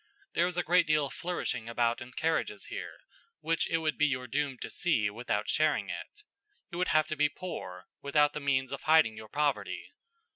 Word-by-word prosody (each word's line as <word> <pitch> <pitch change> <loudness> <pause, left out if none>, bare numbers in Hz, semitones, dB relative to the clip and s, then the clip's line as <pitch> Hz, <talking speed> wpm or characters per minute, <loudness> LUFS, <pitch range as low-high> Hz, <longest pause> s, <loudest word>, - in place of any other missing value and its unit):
There 170 +1 +3
is 180 -1 -4
a 175 - +2
great 175 -1 +4
deal 155 -1 +3
of 140 - -6
flourishing 125 -10 -3
about 115 +1 +1
in 125 +1 -9
carriages 160 0 -1
here, - - -6 0.4
which 165 0 0
it 165 - +2
would 155 -2 -1
be 150 - +5
your 130 -2 -1
doom 140 +1 -1
to - - -4
see 110 -12 +1
without 105 -1 -2
sharing 155 0 +2
it. 420 +1 -8 0.5
You 175 - -4
would 180 - +1
have 155 0 +3
to 155 - -1
be 150 0 +3
poor, 90 - -7 0.2
without 145 +1 +3
the - - -3
means 135 -2 +1
of 140 - -4
hiding 155 -8 +5
your 110 0 -10
poverty. 145 -1 -1
150 Hz, 205 wpm, -31 LUFS, 125-160 Hz, 0.5 s, be